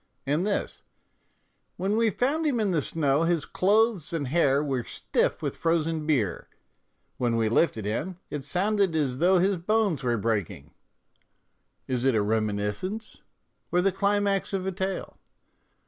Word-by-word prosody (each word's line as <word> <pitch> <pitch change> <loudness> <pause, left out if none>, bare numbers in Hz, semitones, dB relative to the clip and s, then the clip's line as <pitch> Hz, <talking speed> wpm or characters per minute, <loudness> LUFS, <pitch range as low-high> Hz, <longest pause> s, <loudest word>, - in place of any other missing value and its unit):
And 150 +8 0
this: 205 - -2 0.5
" - - -45
When 195 +3 0
we 225 0 +3
found 285 - 0
him 255 -5 +1
in 210 -3 +1
the 165 -4 +1
snow 145 -1 +1
his 165 -2 +1
clothes 205 -4 +1
and 145 -6 -2
hair 145 -2 +3
were 135 -4 -1
stiff - - -1
with - - -3
frozen 165 -2 0
beer; 125 - 0 0.7
when 120 -2 0
we 115 -1 +1
lifted 115 -4 +1
him 155 - -3
it 145 -2 -4
sounded 190 +3 +1
as 135 -5 0
though 185 +2 +4
his 190 +2 +2
bones 195 - 0
were 120 -2 +1
breaking 105 -4 -2 0.6
": - - -47
is 125 -2 -1
it 135 -3 +3
a 110 - +3
reminiscence 110 - -2 0.5
or 175 - +3
the 195 - +3
climax 200 0 0
of 190 -1 -1
a 190 - -1
tale? 190 0 -4
165 Hz, 160 wpm, -27 LUFS, 130-195 Hz, 0.7 s, though